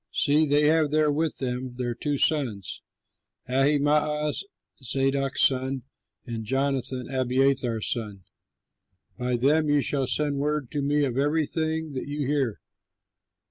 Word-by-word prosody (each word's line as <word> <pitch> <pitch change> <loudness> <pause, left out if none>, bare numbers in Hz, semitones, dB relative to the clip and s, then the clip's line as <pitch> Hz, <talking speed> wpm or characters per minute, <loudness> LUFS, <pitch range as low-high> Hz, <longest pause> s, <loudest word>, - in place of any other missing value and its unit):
See, 150 +2 +2
they 145 +1 +3
have 155 0 +3
there 155 0 +2
with 155 +2 0
them 125 -1 -3
their 125 -1 -2
two 145 +4 -2
sons, 120 - 0 0.7
Ahimaaz, 150 +3 +1 0.4
Zadok's 135 +2 0
son, 130 0 +1 0.4
and 115 -3 -5
Jonathan, 130 0 -1
Abiathar's 130 -3 +1
son. 105 -5 -4 1.0
By 125 0 0
them 150 +5 +2
you 145 0 +3
shall 135 -1 0
send 145 +2 -1
word 150 -3 -1
to 145 - -2
me 145 +1 +2
of 130 -1 -2
everything 160 +1 0
that 130 - -4
you 145 0 -3
hear." 135 -6 -1
140 Hz, 130 wpm, -26 LUFS, 125-150 Hz, 1.0 s, they